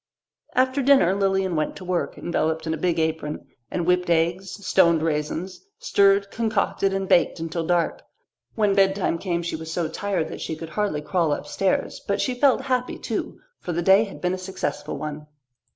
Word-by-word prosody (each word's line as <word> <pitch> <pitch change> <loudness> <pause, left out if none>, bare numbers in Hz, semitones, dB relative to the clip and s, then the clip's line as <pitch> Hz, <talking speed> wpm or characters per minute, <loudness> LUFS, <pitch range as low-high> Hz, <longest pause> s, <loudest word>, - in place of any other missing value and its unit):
After 260 +2 +2
dinner 265 -9 +5
Lilian 195 -2 +1
went 155 -1 -1
to 185 - -9
work, 180 -1 -2
enveloped 160 -1 -1
in 160 - -1
a - - -2
big 170 +1 0
apron, 160 -2 -2 0.2
and 175 - -2
whipped 180 0 +2
eggs, 175 +4 0
stoned 170 -5 +4
raisins, 160 +4 -2
stirred, 200 - +3
concocted, 220 -3 0
and 195 0 -2
baked 175 - +3
until 165 0 -3
dark. 175 -2 +1 0.5
When 210 -3 +2
bedtime 195 -3 +2
came 170 -2 -2
she 170 - -3
was 160 0 -7
so 165 -1 -1
tired 185 -1 -2
that - - -7
she 160 - -3
could 160 +1 -8
hardly 200 -6 -1
crawl 165 0 0
upstairs; 165 +7 -1
but 200 0 0
she 255 - 0
felt 265 +1 +3
happy 255 -2 -1
too, - - -4 0.2
for 175 - -4
the 175 +1 -1
day 195 +4 +6
had 200 - -11
been 180 0 0
a 185 - -3
successful 185 -5 -4
one. 150 +1 -6
180 Hz, 185 wpm, -24 LUFS, 160-200 Hz, 0.5 s, day